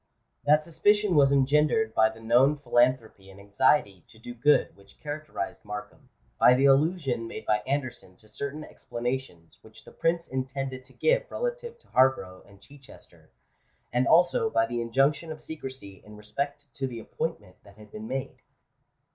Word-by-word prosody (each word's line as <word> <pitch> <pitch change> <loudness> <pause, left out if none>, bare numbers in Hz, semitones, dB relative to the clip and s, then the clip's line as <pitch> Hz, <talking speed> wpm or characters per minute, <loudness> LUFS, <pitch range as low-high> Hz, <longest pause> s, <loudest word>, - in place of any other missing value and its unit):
That 150 +1 +4
suspicion 205 +5 +2
was 140 -3 +5
engendered 150 +10 +2
by 110 0 +4
the 110 0 -13
known 125 +6 +3
philanthropy 120 -6 0
and 95 +1 -14
anxiety 100 - +1
to - - -17
do 120 +2 -9
good 145 +5 +2
which 100 0 -20
characterised 150 -8 -6
Markham; 105 0 -9 0.3
by 125 - +7
the 135 +2 +2
allusion 135 -4 +2
made - - -8
by 105 0 +2
Anderson 130 -9 -4
to 110 - -21
certain 140 +7 -6
explanations 120 - -6
which - - -15
the - - -13
Prince 170 0 -1
intended 130 0 -4
to - - -17
give - - +1
relative 485 -1 -4
to 475 - -26
Harborough 130 -9 +2
and 100 -1 -19
Chichester; 140 -2 -17 0.6
and 125 +2 +2
also 180 +7 +4
by 115 - +2
the 120 0 -3
injunction 135 +7 +1
of 155 - -7
secrecy 130 -12 -9
in 105 0 -13
respect 140 +6 -5
to 135 -1 -3
the 120 -2 -7
appointment 115 - -5
that 100 +1 -18
had 105 -1 -15
been 110 +1 -8
made. 135 +2 -5
130 Hz, 165 wpm, -27 LUFS, 110-150 Hz, 0.6 s, by